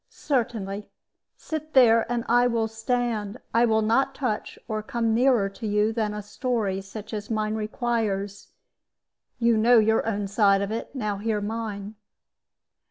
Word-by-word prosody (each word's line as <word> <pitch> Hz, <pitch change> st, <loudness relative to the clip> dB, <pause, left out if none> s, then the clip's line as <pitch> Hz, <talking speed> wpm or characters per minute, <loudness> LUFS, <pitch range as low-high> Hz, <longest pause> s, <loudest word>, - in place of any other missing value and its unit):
"Certainly. 220 Hz, -7 st, -2 dB, 0.5 s
Sit 310 Hz, -1 st, -6 dB
there, 230 Hz, -2 st, +5 dB
and 235 Hz, -1 st, -1 dB
I 245 Hz, +1 st, +4 dB
will 230 Hz, -2 st, 0 dB
stand. 225 Hz, -1 st, -2 dB, 0.2 s
I 235 Hz, +1 st, +5 dB
will 220 Hz, -1 st, +2 dB
not 265 Hz, +5 st, +2 dB
touch 245 Hz, -6 st, -3 dB
or 215 Hz, -1 st, -2 dB
come 230 Hz, +1 st, -1 dB
nearer 240 Hz, -3 st, +3 dB
to 205 Hz, +3 st, -7 dB
you 210 Hz, +1 st, +1 dB
than 220 Hz, -2 st, -1 dB
a 210 Hz, -, -5 dB
story 210 Hz, -3 st, -2 dB
such 210 Hz, +3 st, -9 dB
as 210 Hz, -1 st, -5 dB
mine 215 Hz, -1 st, -1 dB
requires. 215 Hz, -3 st, -2 dB, 0.9 s
You 235 Hz, -1 st, +3 dB
know 235 Hz, +2 st, +5 dB
your 220 Hz, 0 st, +3 dB
own 205 Hz, -2 st, -1 dB
side 200 Hz, -1 st, +3 dB
of 200 Hz, -, -4 dB
it; 230 Hz, +5 st, -5 dB
now 210 Hz, -5 st, -2 dB
hear 215 Hz, +1 st, -1 dB
mine. 210 Hz, -1 st, -4 dB
220 Hz, 155 wpm, -25 LUFS, 210-235 Hz, 0.9 s, there